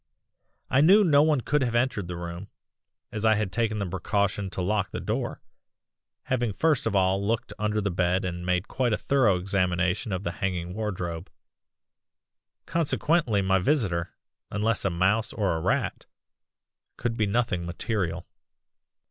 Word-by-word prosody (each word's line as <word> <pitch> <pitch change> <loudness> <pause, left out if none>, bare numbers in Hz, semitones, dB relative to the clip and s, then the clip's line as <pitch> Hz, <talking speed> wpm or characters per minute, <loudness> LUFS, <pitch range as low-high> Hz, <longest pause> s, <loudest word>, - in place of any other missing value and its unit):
"I 135 - +5
knew 195 +7 +7
no 145 -6 +5
one 150 -3 +3
could 150 +4 +1
have 120 -2 0
entered 120 -6 0
the 90 - -5
room, 85 +2 -6 0.6
as 105 - -4
I 110 -1 +5
had 105 -3 -1
taken 110 -1 0
the 100 - -1
precaution 100 +2 -1
to 95 - -6
lock 100 +2 0
the - - -5
door, - - -3 0.8
having 120 -4 -1
first 155 0 +1
of 110 - -1
all 95 +1 +2
looked 115 +3 -1
under 105 0 0
the 100 -1 -1
bed 90 +1 +1
and 90 -1 -4
made 90 +1 0
a 120 -5 0
thorough 120 -9 +2
examination 90 +1 0
of 95 0 -2
the 85 - -2
hanging 90 -2 -2
wardrobe. 90 -5 -4 1.4
Consequently 155 - +1
my 95 0 +3
visitor, 90 - 0 0.3
unless 105 +1 0
a - - +3
mouse 95 +6 +1
or 100 -6 0
a 80 - -3
rat, - - -1 0.9
could 115 -1 -2
be 110 -2 +1
nothing 100 -5 0
material. 90 -2 -2
100 Hz, 155 wpm, -26 LUFS, 90-115 Hz, 1.4 s, knew